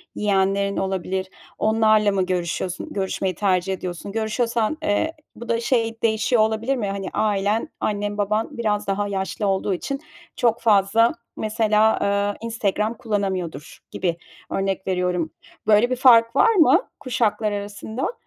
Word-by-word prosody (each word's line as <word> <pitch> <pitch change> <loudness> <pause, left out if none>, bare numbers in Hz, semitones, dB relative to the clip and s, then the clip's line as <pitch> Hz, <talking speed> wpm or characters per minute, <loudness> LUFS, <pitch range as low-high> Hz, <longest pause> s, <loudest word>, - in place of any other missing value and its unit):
yeğenlerin 200 -1 +1
olabilir, 190 0 -2 0.3
onlarla 215 -1 +3
mı 190 -2 +1
görüşüyorsun, 180 0 -3
görüşmeyi 190 -1 -2
tercih 190 0 +1
ediyorsun? 180 +1 -6
Görüşüyorsan, 225 +4 -1
eee, 315 +7 +1 0.2
bu 235 0 -10
da, 230 0 +1
şey 230 -2 0
değişiyor 225 +1 +2
olabilir 220 +4 +1
mi? 225 -6 -2
Hani, 195 -1 -4
ailen, 205 +1 0
annen, 205 0 -2
baban 210 +3 -1
biraz 210 -3 -1
daha 200 +1 0
yaşlı 195 +1 -2
olduğu 195 0 0
için, 275 +10 -4 0.4
çok 235 -1 +1
fazla, 220 +2 +4 0.2
mesela, 215 0 +2
eee, 200 0 0
Instagram 215 -1 -1
kullanamıyordur, 190 - -3
gibi, 175 -3 -1 0.3
örnek 195 0 -2
veriyorum. 180 -3 0 0.4
Böyle 215 +3 +5
bir 255 - 0
fark 235 -2 +5
var 455 - +5
mı 345 +1 +6 0.2
kuşaklar 225 -5 0
arasında? 205 - -4
210 Hz, 135 wpm, -22 LUFS, 195-225 Hz, 0.4 s, mı